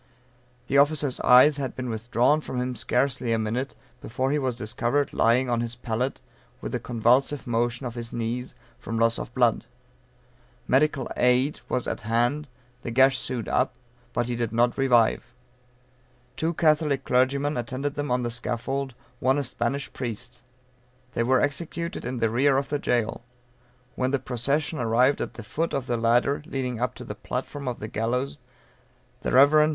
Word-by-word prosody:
The 140 - +3
officer's 145 -2 +2
eyes 130 +4 +6
had 135 -3 -3
been 130 -1 -4
withdrawn 120 +6 +1
from 130 - -4
him 125 0 -2
scarcely 125 +1 0
a - - +2
minute, 115 +5 -2 0.3
before 130 +3 -2
he 150 - +1
was 130 -4 -1
discovered 120 +6 -1
lying 120 +3 +3
on 120 -1 0
his 120 0 -4
pallet, 120 +2 -3 0.4
with - - -6
a - - 0
convulsive 125 +4 +2
motion 120 +2 -1
of 120 - -4
his 115 -1 -5
knees, 120 +2 -3 0.2
from 115 - -4
loss 115 0 +2
of - - -6
blood. 120 -4 +2 1.0
Medical 140 0 +2
aid 125 +4 +2
was 125 - 0
at - - -3
hand, 120 +7 0 0.3
the - - -5
gash 130 +2 +4
sewed 125 -4 -3
up, 130 - +1 0.4
but 120 - 0
he 120 0 -2
did 115 -2 -2
not 120 +1 +2
revive. 125 -2 +2 1.0
Two 165 +1 -1
Catholic 150 -4 +2
clergymen 140 +4 +2
attended 130 +4 -3
them 145 0 -3
on 125 0 +1
the 120 - -2
scaffold, 130 +3 -3 0.2
one 130 +2 +2
a 145 - 0
Spanish 125 +2 -2
priest. 120 0 -6 0.7
They - - 0
were 130 +2 +3
executed 170 +3 -2
in 125 +1 -3
the 115 -2 +1
rear 135 +3 +3
of 135 0 -1
the 145 - -1
jail. 120 -4 0 0.7
When 130 - 0
the 140 - +1
procession 140 +5 -1
arrived 125 +4 +3
at - - -4
the 115 - -8
foot 160 +9 -2
of 135 -2 -2
the 120 - -1
ladder 120 +5 +2
leading 125 -6 -3
up 125 - -1
to 125 - -9
the 110 - -6
platform 130 +6 -5
of 125 - -2
the 110 - -6
gallows 120 +5 -2 0.8
the - - -2
Rev. 140 +3 +7
Mr. 155 0 +5
125 Hz, 175 wpm, -26 LUFS, 120-140 Hz, 1.0 s, Rev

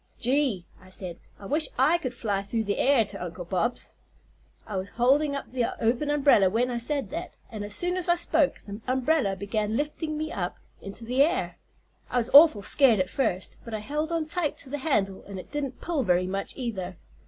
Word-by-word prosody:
"'Gee!' 250 -7 +1 0.2
I 185 - -16
said, 180 -2 -7 0.2
'I 200 - -11
wish 300 +7 +1
I 305 +7 +4
could 255 -5 -4
fly 205 -4 -1
through 220 +3 -2
the 205 -1 -2
air 265 -4 +4
to 200 - -5
Uncle 175 0 -6
Bob's.' 185 +6 -2 0.7
"I 210 - -6
was 190 +1 -3
holding 280 +6 +2
up 280 - -6
the 245 -2 -1
open 245 +6 +1
umbrella 280 -10 +5
when 240 +5 +1
I 240 - -2
said 270 -3 -1
that, - - -5 0.2
and 215 -2 -5
as 205 0 -5
soon 355 +1 0
as 365 -1 +1
I 345 - +5
spoke, 320 -4 +2
the 205 +2 -9
umbrella 260 -4 +1
began 210 +2 -2
lifting 305 +1 -3
me 310 +1 -3
up - - -3 0.2
into 200 +4 -7
the 250 +4 +1
air. 335 +6 +1 0.5
I - - -1
was 240 0 0
awful 285 -8 +8
scared, 250 -5 +4
at 185 - 0
first, 190 -9 -1
but 230 -2 -5
I - - -3
held 300 +7 -2
on 330 -2 0
tight 310 -1 -1
to 265 - -10
the 290 - -2
handle 200 -11 0
and 200 -1 -7
it 185 - -10
didn't 280 -3 -4
pull 330 -4 -1
very 180 -5 +2
much, 195 +2 -4
either. 190 -8 -4
245 Hz, 210 wpm, -27 LUFS, 200-295 Hz, 0.7 s, awful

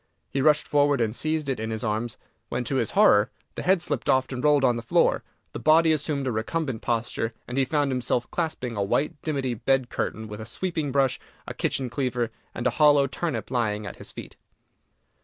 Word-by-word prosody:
He 135 - 0
rushed 150 +1 +3
forward 145 -1 +3
and 115 -1 0
seized 155 0 -1
it 135 -4 -1
in 110 0 -3
his 110 -1 -4
arms, 110 +1 -2 0.3
when, 120 +1 -2
to 135 +3 -1
his - - 0
horror, 125 - +6 0.2
the - - -5
head 185 -1 +2
slipped - - -2
off 130 0 +2
and 130 -1 -4
rolled 150 -2 +4
on 125 -2 +4
the 115 - -3
floor, 115 - +2 0.3
the - - -5
body 160 +1 +5
assumed 150 -2 -1
a 130 - 0
recumbent 120 +3 -2
posture, 115 -1 -2
and 125 - -5
he 135 0 +3
found 145 0 +1
himself 125 -1 0
clasping 155 -8 -2
a 100 - -1
white 140 +8 0
dimity 135 -5 -1
bed 130 +2 +1
curtain, 110 0 -3
with 105 +1 -7
a - - -6
sweeping 160 +1 -2
brush, 135 -1 +2 0.3
a - - -4
kitchen 130 - -1
cleaver, 125 -2 -1 0.2
and 120 - -4
a 125 - +3
hollow 145 -2 +6
turnip 135 -4 -3
lying 105 -4 0
at - - -7
his - - -8
feet! - - -10
130 Hz, 210 wpm, -26 LUFS, 115-145 Hz, 0.3 s, horror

